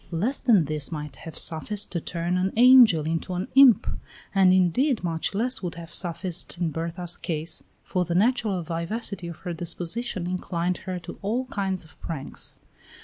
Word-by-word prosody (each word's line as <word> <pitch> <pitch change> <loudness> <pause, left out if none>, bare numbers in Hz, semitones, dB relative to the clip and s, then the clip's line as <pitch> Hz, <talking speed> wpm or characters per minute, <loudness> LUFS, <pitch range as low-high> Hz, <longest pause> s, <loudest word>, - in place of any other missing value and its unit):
Less 205 +11 -1
than 215 -10 +4
this 150 +1 -2
might 150 -2 -5
have 165 - -9
sufficed 195 +6 -1
to 170 - -2
turn 170 +2 -2
an 185 +1 +1
angel 240 - +7
into 165 +3 -2
an 180 +2 -2
imp, 265 -6 +7 0.5
and 190 -2 +5
indeed 200 - +2
much 165 +2 -2
less 250 +5 0
would 175 -3 -4
have 170 0 -9
sufficed 175 0 -1
in 170 -3 0
Berta's 170 +2 -4
case, 160 0 -2 0.2
for 180 -2 -1
the 170 0 -3
natural 210 -3 +2
vivacity 175 +3 -3
of 170 -2 -7
her 175 - -2
disposition 175 +4 -4
inclined 180 -1 -2
her 185 - -2
to 175 - -9
all 230 +6 -1
kinds 190 -3 -2
of 160 - -19
pranks. 150 -5 -3
180 Hz, 170 wpm, -25 LUFS, 165-200 Hz, 0.5 s, angel